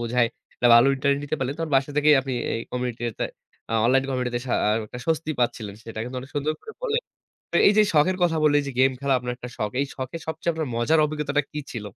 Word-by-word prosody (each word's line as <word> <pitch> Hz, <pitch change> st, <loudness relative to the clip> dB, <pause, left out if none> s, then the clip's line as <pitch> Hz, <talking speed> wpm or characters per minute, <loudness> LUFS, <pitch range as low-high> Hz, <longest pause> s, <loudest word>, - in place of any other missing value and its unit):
বোঝায় 120 Hz, 0 st, +2 dB, 0.3 s
একটা 125 Hz, -, +1 dB
ভালো 120 Hz, +2 st, +7 dB
ইন্টারনেট 140 Hz, +1 st, +1 dB
নিতে 145 Hz, -, -2 dB
পারলেন, 135 Hz, +1 st, -2 dB
তখন 165 Hz, -2 st, -3 dB
বাসা 135 Hz, +2 st, +1 dB
থেকেই 150 Hz, 0 st, +6 dB
আপনি 135 Hz, -1 st, -5 dB, 0.2 s
এই 115 Hz, -, -2 dB
কমিউনিটিতে 120 Hz, -2 st, -3 dB, 0.5 s
আ -, -, -2 dB
অনলাইন 130 Hz, +2 st, +4 dB
কমিউনিটিতে 125 Hz, -2 st, -1 dB
শা -, -, -2 dB
আ -, -, +3 dB, 0.2 s
একটা 125 Hz, -, -9 dB
স্বস্তি 160 Hz, -1 st, 0 dB
পাচ্ছিলেন। 115 Hz, -4 st, -1 dB
সেটা 115 Hz, -1 st, -8 dB
কিন্তু 125 Hz, +1 st, -6 dB
অনেক 135 Hz, -, -11 dB
সুন্দর 145 Hz, +2 st, 0 dB
করে 445 Hz, -, -10 dB
বললেন। 475 Hz, 0 st, 0 dB, 0.5 s
তো -, -, -3 dB
এই -, -, +7 dB
যে 215 Hz, -, +5 dB
এই 210 Hz, -, 0 dB
শখের 185 Hz, +5 st, +3 dB
কথা 165 Hz, -2 st, +2 dB
বললেন 145 Hz, -1 st, +5 dB
এই 140 Hz, -, -7 dB
যে, -, -, -3 dB
গেম 135 Hz, +1 st, +5 dB
খেলা 140 Hz, -1 st, +1 dB
আপনার 125 Hz, 0 st, -4 dB
একটা 125 Hz, -, -8 dB
শখ। 105 Hz, -, -1 dB
এই 140 Hz, -, +2 dB
যে -, -, -12 dB
শখের 130 Hz, +5 st, -5 dB
সবচেয়ে 160 Hz, +2 st, -1 dB
আপনার 160 Hz, -3 st, -3 dB
মজার 150 Hz, +7 st, +3 dB
অভিজ্ঞতাটা 150 Hz, -1 st, -1 dB
কি 150 Hz, -, -4 dB
ছিল? 115 Hz, -, -5 dB
135 Hz, 245 wpm, -24 LUFS, 125-155 Hz, 0.5 s, ভালো